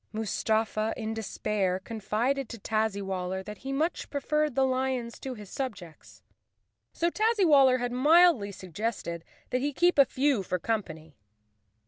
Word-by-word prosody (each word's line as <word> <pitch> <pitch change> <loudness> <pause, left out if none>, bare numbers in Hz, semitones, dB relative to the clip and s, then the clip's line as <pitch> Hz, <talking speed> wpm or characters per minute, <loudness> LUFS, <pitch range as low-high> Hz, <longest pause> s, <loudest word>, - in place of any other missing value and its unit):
Mustafa, 220 0 -1
in 220 -1 -3
despair, 210 -3 -1
confided 230 +6 -2
to 235 - -7
Tazzywaller 195 -4 -2
that 210 0 -8
he 270 - -6
much 310 +6 -1
preferred 300 0 0
the 270 - +3
lions 255 -2 -2
to 260 -1 -5
his 210 -3 -11
subjects. 200 - -7 0.7
So 340 +1 0
Tazzy¬ 435 -1 +2
waller 270 -5 +6
had 245 0 -2
mildly 290 - +5
suggested 185 -2 -4 0.3
that 250 - 0
he 290 +1 -1
keep 350 +2 +3
a 280 - +9
few 265 -3 +1
for 185 -1 -2
company. 165 -6 -4
230 Hz, 140 wpm, -28 LUFS, 200-275 Hz, 0.7 s, a